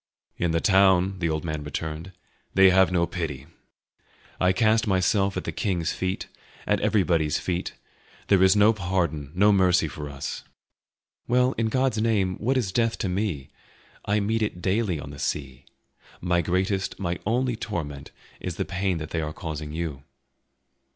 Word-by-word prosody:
"In 85 - 0
the 85 0 +1
town," 95 0 +4
the 85 -2 0
old 80 +1 -2
man 75 -2 -3
returned, 80 +4 -5 0.4
"they 95 0 +7
have 95 0 +4
no 85 -2 +2
pity; 80 -6 -5 0.9
I 90 0 +4
cast 110 +3 +2
myself 95 +1 +2
at - - -3
the - - -3
king's 90 -7 -1
feet, 95 +1 -3 0.4
at - - +1
everybody's 85 -7 +2
feet; 90 -1 -3 0.5
there 100 -2 +4
is 95 +1 +6
no 105 +2 +5
pardon, 85 -8 -2
no 100 +3 +5
mercy 90 -4 +3
for 75 +1 -7
us." 70 -1 -6 0.8
"Well, 125 +1 +3
in 115 0 0
God's 130 -1 +1
name, 100 -5 +1
what 130 +5 0
is 110 -7 -1
death 115 +2 +1
to 95 - -2
me? 90 -8 -2 0.5
I 105 +1 +1
meet 110 +2 0
it 105 -5 -2
daily 95 -2 0
on 70 0 -8
the 70 - -10
sea. 65 -2 -4 0.5
My 90 -1 +1
greatest, 95 +3 -1
my 90 -2 -2
only 125 +2 +1
torment 75 -11 -5 0.3
is 90 -3 -4
the - - -2
pain 95 -1 -1
that 80 -1 -6
they 80 - -1
are 75 0 -4
causing 75 -2 -6
you." 80 -4 -4
90 Hz, 165 wpm, -25 LUFS, 80-100 Hz, 0.9 s, they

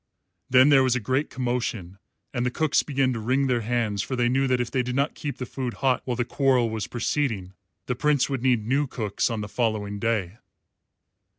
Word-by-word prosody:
Then 130 +2 +6
there 140 -2 +6
was 130 -1 +2
a - - +1
great 130 +6 -1
commotion, 115 -7 -3 0.3
and 120 -2 -1
the 125 - +1
cooks 155 +3 +2
began 135 -3 0
to 115 - -4
wring 130 +5 +1
their 125 -3 +1
hands, 110 -3 -1
for 130 - -3
they 120 -1 +2
knew 135 +2 +2
that 125 -1 +1
if 120 -1 -2
they 130 - +1
did 125 0 -3
not 140 +2 +1
keep 145 -2 -5
the 125 - -4
food 125 -1 -4
hot 130 -3 +1
while 125 - -1
the 120 - 0
quarrel 130 -4 +2
was 110 0 -3
proceeding, 115 -6 -2 0.3
the 125 - -1
Prince 145 +1 +2
would 135 -3 -3
need 120 -4 +2
new 140 +5 +1
cooks 105 -4 -1
on 115 -2 -3
the 105 - -5
following 105 -2 -2
day. 110 -2 -1
125 Hz, 215 wpm, -25 LUFS, 110-130 Hz, 0.3 s, Then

